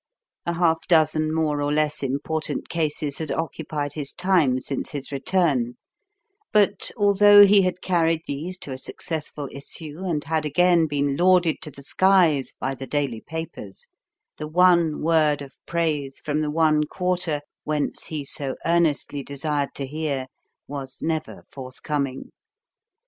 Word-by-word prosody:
A 170 - +1
half 165 -1 +1
dozen 155 -2 +3
more 155 -2 0
or 145 0 0
less 150 0 +1
important 145 +4 -3
cases 150 -3 -1
had 160 -2 -3
occupied 155 -3 -3
his 145 -3 -5
time 175 -9 +2
since 135 +1 -4
his 140 -2 -6
return; 135 -4 +1 0.8
but, 205 -2 +3
although 205 0 +7
he 200 0 +6
had 185 -1 -1
carried 165 -3 +2
these 165 +7 -5
to 140 - -7
a 130 - -5
successful 150 -1 -5
issue 150 +3 -5
and 170 -6 -2
had 160 +1 -1
again 170 +2 +3
been 140 -1 0
lauded 180 -2 +4
to 155 - -5
the 140 -1 -13
skies 175 -4 +3
by 135 - -2
the 135 0 -8
daily 135 -6 -2
papers, 160 - -8 0.5
the 150 - -5
one 170 -2 +3
word 155 -3 +2
of 135 -1 -12
praise 155 -5 -1
from 150 0 -1
the 150 - -1
one 155 -1 +3
quarter 180 -5 -1 0.2
whence 150 -1 -2
he 150 -3 -5
so 135 -1 -3
earnestly 165 -4 +1
desired 140 +1 -3
to 140 - -3
hear 145 -2 -3 0.4
was 135 -2 -7
never 160 -1 -3
forthcoming. 135 +1 -4
155 Hz, 145 wpm, -24 LUFS, 145-170 Hz, 0.8 s, although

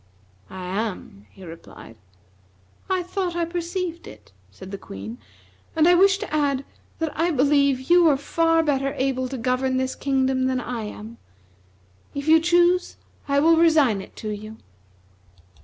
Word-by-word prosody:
"I 185 -1 -8
am," 185 - -5
he 190 - -14
replied. 165 -8 -12 0.9
"I 370 -1 0
thought 365 -1 -3
I 340 -1 0
perceived 345 0 -4
it," 105 -1 -14 0.2
said 185 - -12
the 200 - -5
Queen, 105 +5 -9 0.6
"and 320 0 +4
I 355 - +6
wish 385 +2 +5
to 415 -6 -7
add 280 -2 0 0.3
that 320 -2 -2
I 335 +2 +1
believe 280 -3 +2
you 350 -2 +6
are 280 - +3
far 330 +3 +1
better 275 -2 -1
able 260 -1 -1
to 265 - -5
govern 255 +2 0
this 260 0 -1
kingdom 265 -1 0
than 260 -1 0
I 240 -3 -5
am. 215 +2 -9 1.0
If 280 +1 -5
you 320 +1 +7
choose 350 +2 +2 0.3
I 280 0 +2
will 325 +2 +5
resign 305 -11 +4
it - - -14
to 215 - -6
you." 215 +1 -7
275 Hz, 155 wpm, -23 LUFS, 230-330 Hz, 1.0 s, you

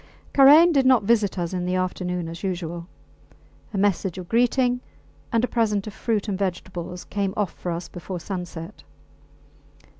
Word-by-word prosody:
Karain 295 +5 +8
did 275 -4 +3
not 255 -5 +5
visit 210 -3 +2
us 175 0 -2
in 180 -1 -2
the 180 +1 -1
afternoon 180 -1 -2
as 165 +2 -7
usual. 175 -3 -4 0.8
A 205 - -4
message 190 -2 +1
of 180 -2 -7
greeting 245 +2 +2 0.5
and 230 0 +2
a - - +2
present 215 -5 0
of 215 - -7
fruit 220 -1 -1
and 195 -2 -2
vegetables 180 -2 -4
came 200 -1 -2
off 205 -5 0
for 175 - -5
us 170 +1 -4
before 180 0 -7
sunset. 175 0 -6
190 Hz, 160 wpm, -24 LUFS, 180-225 Hz, 0.8 s, Karain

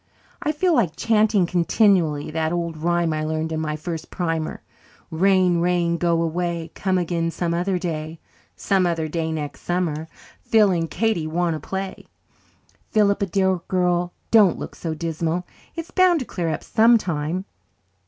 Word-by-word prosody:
I 300 - 0
feel 340 +4 +1
like 205 - +1
chanting 215 -3 +3
continually 170 -4 +2
that 160 0 -1
old 170 -1 -2
rhyme 170 +1 0
I 155 0 -2
learned 160 +1 -2
in 160 0 -2
the 155 -1 -2
first 160 0 -6
primer, 165 -3 -3 0.5
'Rain, 180 0 +3
rain, 170 -1 +1
go 170 -1 +1
away, 170 0 -2
Come 185 0 0
again 170 -1 -1
some 170 0 -2
other 180 +2 0
day: 160 -2 -4 0.4
some 190 -3 +1
other 165 -2 -1
day 160 0 -2
next 150 -2 -5
summer 165 -3 -2 0.3
Phil 215 -3 +4
and 165 -2 -1
Katie 220 -9 0
want 170 +1 0
to 155 - -4
play.' 190 +5 -5 0.8
Philippa, 200 -1 +2
dear 190 +1 +1
girl, 180 -1 +1 0.2
don't 210 -6 +6
look - - -7
so 160 -2 -4
dismal. 165 +2 -2 0.3
It's 330 0 -6
bound 370 -3 +4
to - - -4
clear 175 -6 -3
up - - -3
sometime." 185 -7 +2
175 Hz, 155 wpm, -22 LUFS, 160-190 Hz, 0.8 s, don't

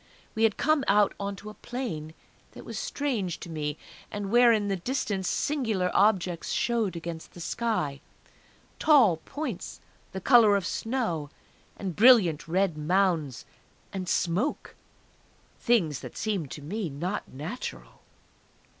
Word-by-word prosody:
We 225 +1 +3
had 215 - +1
come 310 -2 +2
out 205 0 +4
onto 200 +1 -5
a - - -12
plain 190 -12 -5 0.4
that - - -11
was - - -5
strange 265 - -2
to 170 - -8
me, 150 -1 -3 0.3
and 205 -1 -5
where, 240 0 +6
in 210 -3 +2
the 195 - 0
distance, 195 -2 -2
singular 225 -11 0
objects 185 -5 +2
showed 225 -7 0
against 165 -1 -7
the - - -10
sky 165 -8 -2 0.8
tall 260 - +5
points 250 - -6 0.3
the 190 - -5
colour 220 -1 +6
of 200 - 0
snow, 220 - -2 0.5
and 190 -4 -4
brilliant 205 - +5
red 175 -2 +1
mounds, 160 - +1 0.5
and 185 -2 -4
smoke... 190 - -1 0.9
things 175 - +2
that - - -9
seemed 195 -10 -2
to 145 - -8
me 195 +4 -3
not 175 +9 -4
natural! 160 - -7
195 Hz, 135 wpm, -27 LUFS, 165-230 Hz, 0.9 s, where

